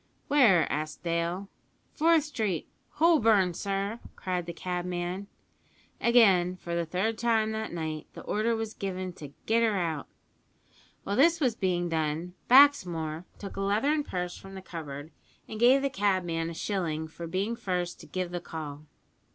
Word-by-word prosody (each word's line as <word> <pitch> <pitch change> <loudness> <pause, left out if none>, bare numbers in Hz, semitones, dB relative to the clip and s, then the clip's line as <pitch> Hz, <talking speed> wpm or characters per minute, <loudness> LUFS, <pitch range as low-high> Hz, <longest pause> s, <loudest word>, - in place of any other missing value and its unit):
"Where?" 240 - +5
asked 155 +3 -4
Dale. 170 +3 -1 0.5
"Forth 325 0 +4
Street, 220 - -2 0.3
Holborn, 225 - +4
sir!" 200 +4 -2 0.2
cried 180 -2 -3
the - - -3
cabman. 180 +2 -3 0.7
Again, 195 -7 +5
for 170 -1 -6
the 170 -1 -1
third 205 +6 -1
time 225 -2 +2
that 220 0 -3
night, 160 -2 -4
the - - -9
order 225 +2 0
was 225 -1 -4
given 185 -2 -4
to 145 -5 -10
"get 230 +1 +3
her 220 -3 +2
out." 160 -5 -2 1.0
While 200 - -2
this 335 +5 +5
was 255 -6 +2
being 180 -3 0
done, 160 +1 -2 0.2
Baxmore 180 - +5
took 200 - -8
a - - -2
leathern 270 +10 +1
purse 180 -7 -4
from 195 0 -11
the 190 - -8
cupboard, 155 -4 -7 0.4
and 215 - -7
gave 255 +4 +5
the 275 - +2
cabman 180 -6 0
a 170 - -7
shilling 160 -5 -2
for 170 +1 -8
being 195 +7 -1
first 180 -6 -3
to - - -12
"give 185 -1 -3
the 175 -1 -3
call." 155 -3 -7
185 Hz, 160 wpm, -29 LUFS, 170-220 Hz, 1.0 s, Where